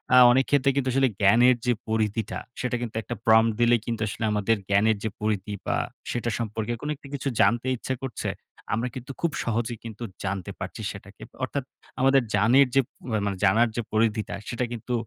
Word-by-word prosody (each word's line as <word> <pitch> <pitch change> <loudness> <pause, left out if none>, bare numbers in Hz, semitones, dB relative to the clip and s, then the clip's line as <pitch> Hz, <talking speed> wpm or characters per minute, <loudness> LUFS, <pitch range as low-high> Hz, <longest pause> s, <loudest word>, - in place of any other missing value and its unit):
আ - - +8
অনেক 130 +2 +3
ক্ষেত্রে 140 -1 +3
কিন্তু 135 -2 +1
আসলে 135 0 +3
জ্ঞানের 120 +6 +6
যে 125 - +3 0.2
পরিধিটা, 110 -1 -1 0.2
সেটা 125 -1 -1
কিন্তু 115 -2 -5
একটা 120 - -5
prom 110 0 +6
দিলেই 120 -1 +4
কিন্তু 115 -2 -3
আসলে 100 - -5
আমাদের 105 +2 +1
জ্ঞানের 105 +2 +3
যে 110 - 0
পরিধি 105 -1 -1
বা - - +1 0.4
সেটা 120 -1 -1
সম্পর্কে 110 0 -2
কোনো 150 - -2
একটি 140 - -14
কিছু 140 0 -3
জানতে 120 +2 +3
ইচ্ছা 130 - -3
করছে, 130 -3 -3 0.4
আমরা 115 +4 0
কিন্তু 130 +1 -7
খুব 170 - +1
সহজেই 115 0 -2
কিন্তু 115 +1 -7 0.2
জানতে 100 -2 -3
পারছি - - -6
সেটাকে। - - -12 0.2
অর্থাৎ 140 - -2 0.4
আমাদের 135 +1 +5
জানের 120 +7 +5
যে 135 - +6 0.4
মানে 100 -2 -2
জানার 115 +5 +4
যে 120 - 0
পরিধিটা, 110 -1 +1
সেটা 125 +1 -1
কিন্তু 120 +1 -4
115 Hz, 185 wpm, -26 LUFS, 110-125 Hz, 0.4 s, আ